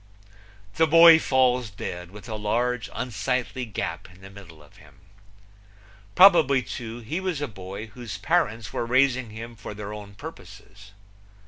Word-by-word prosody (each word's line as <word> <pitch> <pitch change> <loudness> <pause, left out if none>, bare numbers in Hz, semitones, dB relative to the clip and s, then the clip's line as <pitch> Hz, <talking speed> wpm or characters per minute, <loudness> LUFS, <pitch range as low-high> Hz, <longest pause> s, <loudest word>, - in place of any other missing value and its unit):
The 160 - +4
boy 165 +1 +8
falls 125 -4 +1
dead, 90 -2 -7
with 105 +4 -12
a 110 - -6
large 115 +3 -1
unsightly 125 +2 -3
gap 110 -4 -5
in 90 +1 -19
the 95 0 -12
middle 85 -6 -14
of 75 - -21
him. - - -20 1.1
Probably, 160 -9 +6
too, 115 +2 -7
he 150 +11 -4
was 185 -5 -3
a 145 - -3
boy 100 -1 -8
whose 115 -2 -8
parents 105 +1 -1
were 115 - -2
raising 130 -1 +2
him 115 +2 -9
for 105 -1 -9
their 105 0 -7
own 100 -1 -10
purposes. 105 - -12
115 Hz, 150 wpm, -25 LUFS, 100-130 Hz, 1.1 s, boy